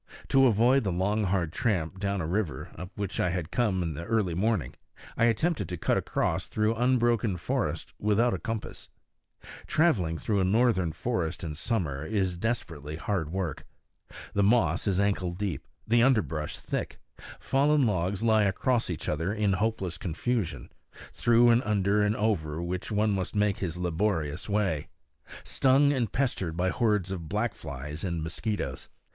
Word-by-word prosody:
To 135 -1 +6
avoid 120 +4 +4
the 95 - -1
long 100 +4 0
hard 90 -4 0
tramp 95 -5 -1
down 100 -1 -1
a - - -2
river, 85 -6 -2
up 90 - -7
which 100 -2 -4
I 90 - +2
had 85 -2 -3
come 100 -7 +1
in 80 -2 -2
the 80 +4 -6
early 100 -3 0
morning, 95 - 0 0.4
I 115 - +3
attempted 155 +9 +1
to 90 - -4
cut - - +1
across - - -1
through 110 +1 +1
unbroken 120 -4 +2
forest 85 - -2
without 110 +4 +2
a - - -2
compass. 115 -3 -5 0.8
Traveling 105 - +2
through 105 +3 0
a - - +2
northern 95 -3 +2
forest 90 -2 -2
in 80 -2 -3
summer 75 - -2
is 95 +1 -1
desperately 80 -8 -3
hard 85 -1 -2
work. 90 -5 -3 0.7
The 100 - +2
moss 100 -6 +3
is 95 -2 +1
ankle 100 -3 0
deep, 90 -6 -4 0.2
the 115 +1 +4
underbrush 110 - +1
thick; - - -4 0.4
fallen 140 +1 +3
logs 95 0 0
lie 110 -2 +4
across 115 +5 +1
each 85 -3 -4
other 80 +5 -1
in 105 -2 +1
hopeless 95 -4 -1
confusion, 100 +3 -2 0.4
through 120 0 +4
and 115 +1 +4
under 105 -2 +1
and 105 +1 +2
over 85 -9 0
which 90 +4 -3
one 105 +1 +2
must 95 -1 -2
make 105 -1 +1
his 90 -3 -3
laborious 90 -2 -1
way, 95 -8 0 0.6
stung 140 +2 +3
and 120 -6 -1
pestered 95 -11 -1
by 90 +1 +1
hordes 105 -2 +1
of 85 -5 -5
black 105 +2 0
flies 75 +2 -7
and 85 -4 -2
mosquitoes. 80 - -4
100 Hz, 165 wpm, -28 LUFS, 85-115 Hz, 0.8 s, To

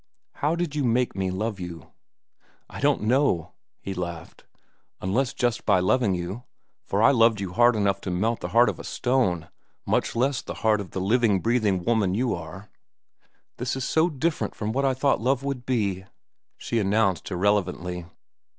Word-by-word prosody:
How 150 +3 +1
did 170 -4 -3
you 145 - 0
make 125 0 +1
me 95 -1 -1
love 105 +2 -3
you?" 85 -4 -8 0.8
"I - - -9
don't - - +2
know," 120 - +1 0.3
he 95 - -5
laughed, 85 -2 -7 0.5
"unless 120 +8 0
just 120 -2 -1
by 100 -3 +3
loving 100 +1 +2
you, 90 +6 -5 0.5
for 100 +3 +1
I 135 - +7
loved 115 -4 +4
you 95 -2 -4
hard 120 +2 +5
enough 100 -2 +1
to - - -5
melt 110 +6 0
the - - -4
heart 120 +1 +4
of - - -2
a - - -7
stone, 120 -11 0 0.4
much - - 0
less 130 +3 +1
the - - -7
heart 105 -2 +3
of 95 - -8
the 95 - -4
living, 110 0 +2
breathing 105 -5 +1
woman 105 -4 +1
you 120 +2 0
are." 90 +5 -8 0.9
"This 125 +2 -2
is 130 - -3
so 160 +2 +3
different 155 +2 -2
from 105 0 -3
what 135 +4 0
I 135 -1 +2
thought 135 -3 +1
love 130 +2 +1
would 135 -3 -4
be," 100 -7 -1 0.5
she 115 - -2
announced 100 -2 +1
irrelevantly. 90 -2 -1
110 Hz, 180 wpm, -25 LUFS, 95-125 Hz, 0.9 s, I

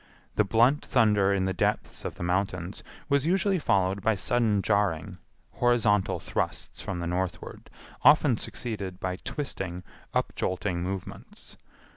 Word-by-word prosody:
The 105 - +4
blunt 120 +8 +3
thunder 105 -5 +3
in 95 -1 +1
the 95 - 0
depths - - -1
of - - -4
the - - -6
mountains 90 0 -1 0.3
was 140 +1 +2
usually 190 +1 +2
followed 95 -6 +1
by 110 +1 +2
sudden 105 0 +1
jarring, 100 -6 0 0.3
horizontal 115 -5 +2
thrusts - - -3
from 95 - -4
the 85 - -3
northward, 90 -1 -4 0.3
often 145 -2 +6
succeeded 100 -7 -4
by 90 0 -3
twisting, 95 - -4 0.3
upjolting 90 0 -1
movements. 95 0 -7
100 Hz, 130 wpm, -27 LUFS, 95-120 Hz, 0.3 s, often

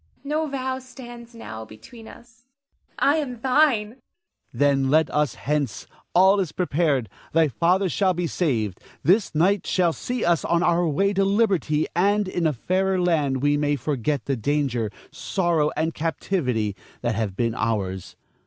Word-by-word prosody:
No 305 +2 -1
vow 260 -2 -3
stands 240 -2 -12
now 110 - -8
between 110 - -13
us. 235 0 -16 0.5
I 285 +3 +3
am 255 -6 -3
thine. 255 -4 +3
Ernest. 235 +4 -17 0.5
Then 140 -2 +2
let 155 +2 +3
us 150 -1 0
hence. 145 -5 -2 0.3
All 190 +3 +6
is 180 -5 -1
prepared; 155 -8 0 0.3
thy 165 0 +4
father 175 - +1
shall 185 +1 +1
be 175 0 -1
saved. 115 - -1 0.2
This 180 +1 +2
night 185 +5 +2
shall 175 -3 +2
see 250 +8 -3
us 170 -2 +2
on 170 0 +1
our 175 0 +2
way 195 +7 +1
to 195 0 +2
liberty; 195 - +1
and 200 +3 +2
in 175 -3 0
a 155 - 0
fairer 185 +8 0
land 150 -7 +1
we 145 0 +3
may 145 0 +1
forget 140 -1 -2
the 135 - 0
danger, 125 -3 -1 0.2
sorrow, 170 -1 0
and 160 +1 0
captivity 130 - -1 0.3
that 120 -1 0
have 105 -3 -2
been 115 +1 0
ours. 100 -5 -3
170 Hz, 160 wpm, -24 LUFS, 140-200 Hz, 0.5 s, All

